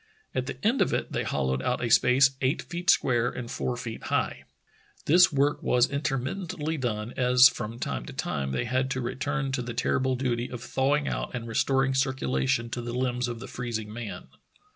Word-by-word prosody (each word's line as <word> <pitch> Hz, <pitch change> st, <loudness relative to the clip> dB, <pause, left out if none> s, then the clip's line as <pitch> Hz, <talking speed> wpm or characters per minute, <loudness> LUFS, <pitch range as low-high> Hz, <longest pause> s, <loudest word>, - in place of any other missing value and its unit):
At 130 Hz, 0 st, -2 dB
the -, -, -5 dB
end 235 Hz, +5 st, +3 dB
of -, -, +2 dB
it -, -, -3 dB
they -, -, -1 dB
hollowed 65 Hz, 0 st, -1 dB
out 125 Hz, -, -1 dB
a -, -, -1 dB
space 130 Hz, +4 st, +5 dB
eight 130 Hz, +4 st, +1 dB
feet 175 Hz, +1 st, -4 dB
square 120 Hz, -2 st, +3 dB
and 125 Hz, -1 st, -6 dB
four 125 Hz, -1 st, -2 dB
feet 115 Hz, -2 st, -6 dB
high. -, -, -1 dB, 0.6 s
This 175 Hz, +4 st, +6 dB
work 145 Hz, 0 st, +1 dB
was 125 Hz, 0 st, +3 dB
intermittently 150 Hz, +4 st, -2 dB
done, 115 Hz, -3 st, -3 dB
as 125 Hz, 0 st, +7 dB
from 115 Hz, -2 st, -5 dB
time 65 Hz, -, -4 dB
to -, -, -7 dB
time 70 Hz, -1 st, -2 dB
they 95 Hz, -, -1 dB
had 130 Hz, +2 st, 0 dB
to 130 Hz, -, -2 dB
return 135 Hz, +3 st, -2 dB
to 135 Hz, -, -1 dB
the 120 Hz, -1 st, -6 dB
terrible 130 Hz, +1 st, +1 dB
duty 125 Hz, -2 st, -1 dB
of 125 Hz, -1 st, -7 dB
thawing 140 Hz, +3 st, +1 dB
out -, -, -3 dB
and 115 Hz, -1 st, -5 dB
restoring 135 Hz, +3 st, +1 dB
circulation 115 Hz, -, 0 dB
to 120 Hz, -, -3 dB
the 120 Hz, 0 st, -5 dB
limbs 125 Hz, -1 st, -1 dB
of 120 Hz, -1 st, -5 dB
the 130 Hz, -, -8 dB
freezing 110 Hz, -4 st, -4 dB
man. 115 Hz, -2 st, -7 dB
125 Hz, 195 wpm, -27 LUFS, 120-135 Hz, 0.6 s, as